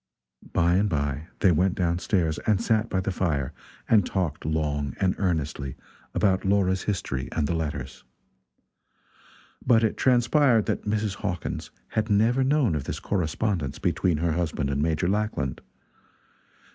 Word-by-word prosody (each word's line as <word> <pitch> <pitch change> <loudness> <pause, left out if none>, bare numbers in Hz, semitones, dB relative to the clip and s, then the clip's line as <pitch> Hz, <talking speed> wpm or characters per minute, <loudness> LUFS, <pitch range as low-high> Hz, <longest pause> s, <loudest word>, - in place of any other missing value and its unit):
By 85 +1 +3
and 105 +2 +2
by 75 -1 -2
they 95 - +5
went 90 +3 +2
down 85 -1 0
stairs 80 -4 0
and 105 -3 +3
sat 115 -1 +1
by 95 - 0
the 95 - -2
fire 75 -7 -1 0.3
and 110 -3 +5
talked 85 -6 -2
long 75 -3 -1
and 95 -2 +2
earnestly 75 -7 -1 0.4
about 95 -2 +2
Laura's 95 -1 +2
history 90 -10 -2
and 80 - 0
the 80 - -1
letters. 70 -5 -4 1.6
But 115 -2 +4
it 110 - +1
transpired 125 -1 +3
that - - -2
Mrs. 105 -1 -1
Hawkins 90 -5 -4 0.2
had 110 0 -1
never 115 +6 +3
known 135 - +2
of 75 -3 -2
this - - -4
correspondence 90 - -1
between 90 -4 +1
her 85 +2 0
husband 75 -4 -1
and 70 +1 -1
Major 80 +2 +1
Lackland. 100 - -1
90 Hz, 145 wpm, -26 LUFS, 75-105 Hz, 1.6 s, they